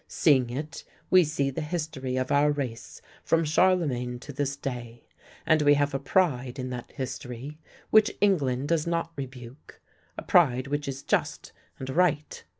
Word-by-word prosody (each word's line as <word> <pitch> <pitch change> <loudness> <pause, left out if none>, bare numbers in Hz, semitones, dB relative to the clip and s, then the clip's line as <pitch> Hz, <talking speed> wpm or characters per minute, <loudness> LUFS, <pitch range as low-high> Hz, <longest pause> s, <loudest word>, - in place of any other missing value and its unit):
Seeing 130 -6 +3
it, 150 +6 -6 0.3
we 185 -1 +7
see 140 -3 -1
the 150 - -4
history 150 -5 -3
of 130 +2 -2
our 145 +1 +4
race 130 -6 -5 0.2
from 165 0 +2
Charlemagne 150 -7 +1
to 145 - -9
this 140 0 -2
day, 120 -4 -7 0.4
and 155 -1 +4
we 145 0 +5
have 145 0 0
a 135 - -1
pride 135 -5 0
in 130 -1 -4
that 125 -1 -7
history 130 +2 -6 0.3
which 215 0 +4
England 145 -9 +1
does 165 -1 +1
not 165 -1 -1
rebuke, 130 -1 -9 0.4
a - - -5
pride 130 -7 +3
which 145 +1 -3
is 135 0 -5
just - - -1 0.3
and 130 - -7
right. 155 -2 0
140 Hz, 160 wpm, -27 LUFS, 130-155 Hz, 0.4 s, we